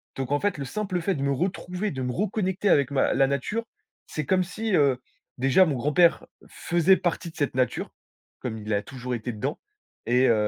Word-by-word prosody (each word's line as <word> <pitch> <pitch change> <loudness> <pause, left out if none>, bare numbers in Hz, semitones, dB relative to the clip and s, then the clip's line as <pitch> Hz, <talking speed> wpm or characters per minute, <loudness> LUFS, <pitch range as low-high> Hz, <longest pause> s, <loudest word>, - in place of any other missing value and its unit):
Donc 135 0 -4
en 145 - +2
fait, 205 -6 0
le 140 - -4
simple 190 +4 -2
fait 190 +1 0
de 140 - -3
me 140 - +1
retrouver, 180 +5 -2
de 130 -2 -4
me 125 - -1
reconnecter 195 - 0
avec 140 -4 +4
ma 135 - +2
la 135 0 +4
nature, 140 - -1 0.4
c'est 155 - -4
comme 185 +2 +2
si, 215 +3 -3
heu, 140 -5 +4 0.4
déjà, 135 +9 +5
mon 150 - 0
grand-père 150 +7 +3 0.2
faisait 175 +2 +3
partie 170 0 -2
de - - -27
cette 145 -4 -1
nature, 130 -1 0 0.5
comme 110 -3 -4
il 105 0 -3
a 100 - +1
toujours 125 0 -5
été 120 +2 -4
dedans 130 +7 -3 0.5
et 125 +3 +4
heu - - +5
145 Hz, 205 wpm, -26 LUFS, 130-185 Hz, 0.5 s, déjà